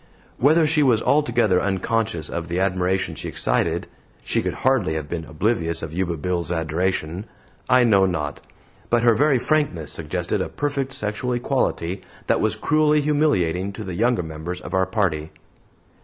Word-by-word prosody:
Whether 155 +5 +5
she 150 0 +2
was 125 -6 +4
altogether 120 -10 +2
unconscious 100 -2 -1
of 85 0 -4
the 85 +2 -2
admiration 95 0 0
she - - -5
excited - - 0 0.4
she - - +1
could - - -3
hardly 115 -12 +2
have 75 -2 -4
been 80 0 -4
oblivious 85 0 0
of 80 -1 -6
Yuba 85 -1 -1
Bill's 85 +1 -2
adoration 85 +2 -1 0.4
I 130 0 +6
know 100 -5 +4
not; 75 -5 -3 0.5
but 120 0 +2
her 120 -1 +6
very 140 +4 +3
frankness 125 - 0
suggested - - -2
a - - -3
perfect 140 -2 -2
sexual 115 +1 -2
equality 95 -6 -1 0.2
that - - +1
was - - +1
cruelly 150 0 +2
humiliating 100 - +1
to 110 - -7
the 95 -3 -5
younger 115 +2 +1
members 80 +3 -6
of - - -9
our 95 -1 +2
party. 90 -7 -1
95 Hz, 160 wpm, -22 LUFS, 85-125 Hz, 0.5 s, I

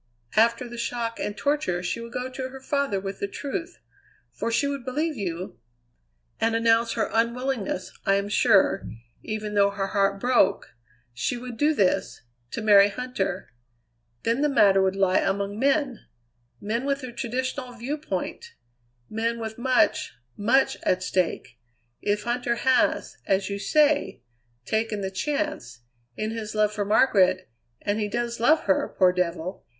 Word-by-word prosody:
After 235 +3 +3
the 240 0 -8
shock 235 -1 -3
and 205 0 -3
torture 280 -12 0
she 185 +6 -2
would 230 0 -8
go 250 +1 -3
to 260 0 -5
her 265 +1 -10
father 275 -6 -1
with 195 0 -6
the 200 - -1
truth 330 - -5 0.5
for 230 - -3
she 230 - +2
would 280 -2 -3
believe 300 +5 -1
you 185 -4 -5 0.8
and 225 0 +1
announce 230 0 +3
her - - 0
unwillingness 235 -4 -1
I 195 - +3
am 200 0 0
sure, 205 -1 +3 0.3
even 215 -1 -4
though 200 -1 +4
her 200 -1 -3
heart 195 0 +1
broke, 235 -5 +2 0.4
she 130 - -2
would 245 0 -7
do 300 +5 +2
this 190 - 0 0.3
to 230 - -5
marry 205 -1 +7
Huntter. 200 -5 -3 0.7
Then 230 +4 +1
the 295 - +3
matter 200 -8 +5
would 190 0 +1
lie 190 -1 +3
among 200 +1 -1
men; 275 -2 0 0.5
men 225 +4 -2
with 280 0 -1
the 255 -2 -6
traditional 255 +2 -3
viewpoint; 295 - -5 0.5
men 230 +2 -2
with 220 0 -6
much, 255 0 +2 0.2
much 240 +6 +2
at 185 0 +1
stake. 170 -10 -1 0.4
If 205 0 0
Huntter 240 0 -1
has, 260 +1 +1
as 195 0 +1
you 200 - -3
say, 300 - +2 0.4
taken 220 -1 -1
the 190 -1 -3
chance, 195 - -3 0.4
in 215 +1 -2
his 220 -1 -5
love 210 0 +2
for 205 -1 -2
Margaret 185 - +3 0.3
and 205 +1 0
he 210 - 0
does 235 +2 -3
love 305 +7 +4
her, 190 - 0
poor 185 -2 +5
devil! 180 +1 -2
225 Hz, 155 wpm, -25 LUFS, 200-255 Hz, 0.8 s, marry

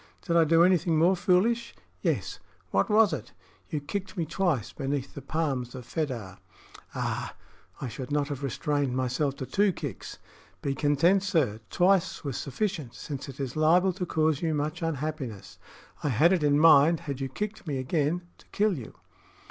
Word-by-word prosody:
"Did 170 - -1
I 165 -1 +6
do 165 +2 +5
anything 175 -2 +3
more 175 +4 +4
foolish?" 195 +7 +1 0.3
"Yes." - - -1 0.3
"What - - +2
was 210 -4 +5
it?" - - -6 0.4
"You 150 - -2
kicked 190 +7 -5
me 170 - 0
twice 165 - -1
beneath 135 0 -3
the 140 - -7
palms 135 -6 -2
of 125 -2 -8
Fedah." 120 - -4 0.6
"Ah! - - -3 0.4
I 135 - -4
should 125 +4 -7
not 145 -1 +1
have 140 -2 -4
restrained 140 0 -1
myself 130 +2 0
to 135 - -5
two 195 - +2
kicks." - - -7 0.5
"Be 140 - 0
content, 150 +7 +3
sir. 155 - +1
Twice 185 0 +2
was 140 -4 -3
sufficient, 150 - -3
since 140 -2 -6
it 135 - -10
is 130 -3 -4
liable 175 +4 +4
to 180 0 -4
cause 155 -3 +1
you 160 -2 0
much 150 +3 -2
unhappiness. 150 - -4 0.4
I 150 - +1
had 155 - +4
it 180 - +1
in 145 -1 +3
mind, 160 +1 +6
had 140 -5 -5
you 135 - -2
kicked 210 +7 -5
me 140 -3 -1
again, 150 +6 0 0.2
to - - -20
kill 210 -2 +1
you." 115 - -10
155 Hz, 175 wpm, -28 LUFS, 135-175 Hz, 0.6 s, I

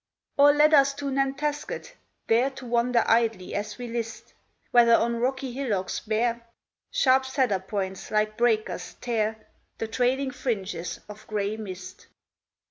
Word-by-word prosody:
Or 285 +1 +7
let 300 +1 +4
us 275 -1 +5
to 285 -1 -4
Nantasket, 290 - -2 0.3
there 240 +4 +3
To 265 -1 -11
wander 235 0 +2
idly 225 -5 +1
as 210 +1 -3
we 245 - -6
list, 230 -1 -5 0.4
Whether, 235 -1 +6
on 235 +1 +1
rocky 260 +2 -1
hillocks 225 -8 -2
bare, 230 +2 -1 0.5
Sharp 265 - +3
cedar 260 -7 +1
points, 190 0 -4
like 215 0 +1
breakers, 215 -6 0
tear 220 -2 -1 0.4
The 225 - -3
trailing 260 +4 0
fringes 195 -10 -3
of 210 +1 -12
gray 210 0 -1
mist. 185 -4 -9
235 Hz, 135 wpm, -26 LUFS, 215-265 Hz, 0.5 s, Or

